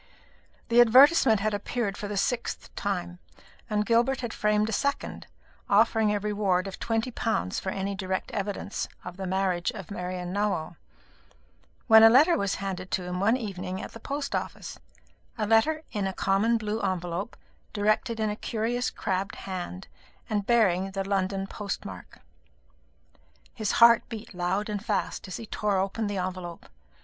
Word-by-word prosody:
The 235 +1 +7
advertisement 245 -2 +6
had 215 +1 0
appeared 205 0 -2
for 205 - -5
the 205 0 -4
sixth 245 +4 -2
time, 175 -3 -3 0.5
and 210 -1 +1
Gilbert 240 +4 +2
had 240 -2 -4
framed 210 0 +1
a - - -3
second, 280 +6 -2 0.4
offering 220 +1 +4
a 205 - 0
reward 200 -3 0
of 195 - -7
twenty 225 +2 -1
pounds 220 - -1
for 190 - -4
any 195 +1 -2
direct 190 -1 -3
evidence 200 0 -3 0.2
of 180 -1 -7
the 190 -1 -4
marriage 185 -1 0
of 195 -3 -9
Marian 180 -1 -4
Nowell; 200 -5 -1 1.1
when 220 0 +8
a 225 - +10
letter 300 +9 +6
was 200 -6 0
handed 185 -2 -5
to 185 - -1
him 180 0 -4
one 220 +6 +3
evening 190 -5 -5
at - - -7
the 230 - -10
post 280 +4 -4
office - - -5 0.6
a 215 - 0
letter 265 +9 +3
in 205 -2 -1
a 190 - -3
common 200 +5 +2
blue 215 0 -3
envelope, 185 +1 -3 0.3
directed 215 +3 0
in 215 -1 +1
a - - -3
curious 235 +3 -1
crabbed 195 -1 -3
hand, 185 0 -6 0.4
and 205 -2 -2
bearing 195 -6 +3
the 195 0 -4
London 195 0 0
post 200 0 -5
mark. 95 -2 -10 1.3
His 215 -3 -2
heart 235 -1 +6
beat 220 -3 -8
loud 185 +3 -1
and 210 -1 -4
fast 210 -2 -2
as 185 - -5
he 230 - -7
tore 210 -2 -1
open 195 +3 -1
this 205 -1 -3
envelope. 180 -2 -5
205 Hz, 165 wpm, -27 LUFS, 190-225 Hz, 1.3 s, a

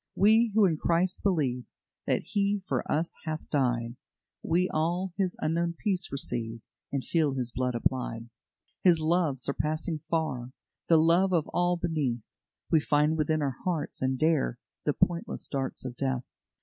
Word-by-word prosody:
"We 220 +3 +5
who 215 -2 +6
in 165 -4 +2
Christ 175 +4 +1
believe 140 -10 0 0.4
That - - +1
He 200 -1 0
for - - 0
us 160 +3 0
hath 155 0 -4
died, 120 -4 0 0.4
We 180 +2 +2
all 175 +4 -1
His 190 -3 -1
unknown 170 +2 0
peace 190 -4 -1
receive, 115 -4 -3 0.3
And 140 -2 -1
feel 155 -5 +1
His 125 -2 -2
blood 125 0 -1
applied. 120 -1 -1 0.5
"His 175 -3 +6
love, 160 -4 +2
surpassing 155 +4 -1
far 135 -7 -1 0.4
The 165 - +7
love 170 +4 +4
of 165 -3 +2
all 175 0 +1
beneath, 150 -9 -1 0.5
We 160 - +6
find 150 +1 +2
within 155 0 +1
our 135 -2 -2
hearts, 165 -5 -2
and 130 0 +1
dare 155 -5 +2 0.3
The 150 - +2
pointless 180 +5 0
darts 135 -2 -3
of 125 -2 -5
death. 130 -2 -1
155 Hz, 155 wpm, -28 LUFS, 130-175 Hz, 0.5 s, The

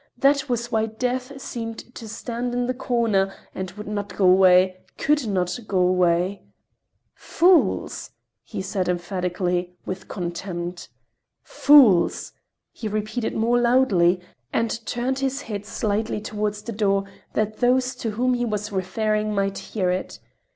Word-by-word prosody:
That 275 +1 +3
was 240 0 -2
why 220 0 +1
Death 255 +4 -3
seemed 230 -1 -6
to 225 -4 -9
stand 240 +2 -4
in 245 0 0
the 255 - -1
corner 230 -6 +1 0.2
and 190 0 -4
would 210 +2 -9
not 205 -1 -4
go 195 - +3
away, 185 0 +5 0.2
could 295 -4 +1
not 180 0 -1
go 195 - -1
away! 180 +1 +2 0.7
"Fools!" 355 0 +2 0.3
he - - -6
said 190 -2 -2
emphatically, 180 0 -2
with 185 0 -6
contempt. 175 -1 -5 0.5
"Fools!" 245 -12 +5 0.4
he 225 - -6
repeated 215 +2 -2
more 235 +2 +2
loudly, 200 -8 +4 0.3
and 230 0 -1
turned 255 +2 -1
his 270 0 -2
head 205 -2 -6
slightly 215 0 -1
toward 210 0 -2
the 210 +3 -7
door 200 -2 +1 0.3
that 215 0 -1
those 255 +1 +2
to 235 - -3
whom 250 +4 +1
he 245 0 0
was 210 -2 -2
referring 215 +3 -1
might 195 0 0
hear 185 -4 -1
it. 185 - -3
215 Hz, 140 wpm, -23 LUFS, 185-240 Hz, 0.7 s, away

